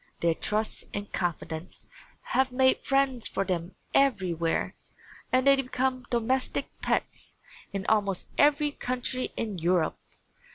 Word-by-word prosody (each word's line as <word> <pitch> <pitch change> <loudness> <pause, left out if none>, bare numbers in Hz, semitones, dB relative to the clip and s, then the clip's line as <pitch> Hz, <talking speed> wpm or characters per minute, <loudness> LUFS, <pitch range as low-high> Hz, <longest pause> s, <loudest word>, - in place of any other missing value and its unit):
Their 170 -1 +3
trust 215 +6 -1
and 205 0 -5
confidence 165 -1 -3 0.5
have 260 0 +3
made 260 +1 +4
friends 270 -4 +1
for - - -1
them 175 -2 -2 0.2
everywhere 185 -11 +2 0.6
and 255 +1 +3
they 275 0 +8
become 255 -1 -1
domestic 250 +2 0
pets - - -2 0.3
in 195 -1 -3
almost 200 -4 +1
every 295 0 +4
country 255 -1 -2
in 210 -5 -2
Europe. 170 0 +1
230 Hz, 120 wpm, -28 LUFS, 180-260 Hz, 0.6 s, they